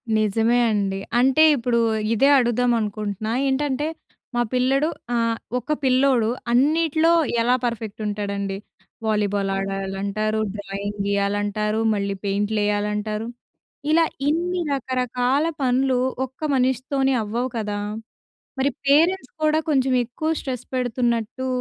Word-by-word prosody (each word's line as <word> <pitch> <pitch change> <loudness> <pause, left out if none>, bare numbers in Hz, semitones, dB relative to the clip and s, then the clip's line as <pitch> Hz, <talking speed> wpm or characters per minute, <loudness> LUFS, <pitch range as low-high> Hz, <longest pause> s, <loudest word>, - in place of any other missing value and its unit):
నిజమే 225 +3 +2
అండి. 195 -2 -1 0.2
అంటే 265 +5 +5
ఇప్పుడు 235 -2 0 0.3
ఇదే 270 +5 +4
అడుగుదాం 245 0 +2
అనుకుంటున్నా. 210 0 -3 0.2
ఏంటంటే, 275 +1 0 0.5
మా 240 - +2
పిల్లడు 270 +4 +2 0.3
ఆహ్, 230 -1 +1 0.2
ఒక 250 +5 -6
పిల్లోడు 255 -3 +3 0.2
అన్నిట్లో 315 +5 +3 0.3
ఎలా 245 +2 +3
పర్ఫెక్ట్ 225 -3 -4
ఉంటాడండి? 200 -1 -3 0.5
వాలీబాల్ 205 -2 0
ఆడాలంటారు, 195 +2 -2 0.2
డ్రాయింగ్ 200 0 -5
గీయాలంటారు, 205 +1 0
మళ్ళీ 200 -1 -2
పెయింట్లు 205 +2 0
యేయాలంటారు. 210 +1 -1 0.6
ఇలా 330 +1 +5 0.2
ఇన్ని 350 +4 0
రకరకాల 255 +1 0 0.2
పనులు 260 0 +2 0.3
ఒక్క 260 0 -18 0.2
మనిషితోనే 265 +1 +1
అవ్వవు 235 +5 -2
కదా! 210 -2 -2 0.8
మరి 270 +1 +2 0.2
పేరెంట్స్ 315 +2 +3
కూడా 310 0 +3
కొంచెం 265 -3 +2
ఎక్కువ 245 +7 -4
స్ట్రెస్ 255 -3 -5
పెడుతున్నట్టు 245 0 -1
235 Hz, 110 wpm, -23 LUFS, 210-265 Hz, 0.8 s, అంటే